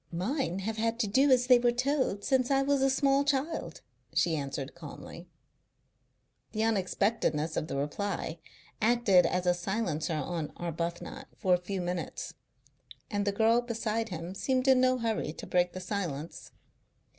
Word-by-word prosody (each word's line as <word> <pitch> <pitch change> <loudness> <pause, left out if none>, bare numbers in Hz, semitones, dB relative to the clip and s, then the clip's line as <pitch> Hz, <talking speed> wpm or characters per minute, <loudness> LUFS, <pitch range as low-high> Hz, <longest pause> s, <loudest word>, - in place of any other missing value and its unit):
Mine 190 - -1
have 220 +3 -3
had 230 +1 0
to 215 - 0
do 265 +8 +4
as 250 -2 +5
they 250 -1 +6
were 240 0 +3
told 250 -5 0
since 260 -2 +2
I 275 -1 +3
was 280 0 +2
a 270 - +4
small 275 +1 +3
child," 285 +3 -2 0.3
she 170 -2 +3
answered 140 -1 -4
calmly. 170 +1 -10 1.3
The 215 0 0
unexpectedness 195 -6 0
of 155 - -1
the 140 - -3
reply 165 +3 -3 0.4
acted 220 -5 +4
as 180 0 -1
a 180 - +4
silencer 175 -3 -2
on 155 +1 -3
Arbuthnot 175 - -4
for 185 -4 +2
a - - +5
few 190 +1 -3
minutes, 175 -1 -4 0.8
and 205 -1 0
the - - +3
girl 225 +3 +3
beside 225 -1 -2
him 170 0 -5
seemed 255 +6 0
in 260 -1 +6
no 255 0 +3
hurry 225 -9 -1
to - - -8
break 180 0 +1
the 185 - -5
silence. 175 -6 -4
205 Hz, 160 wpm, -30 LUFS, 175-250 Hz, 1.3 s, they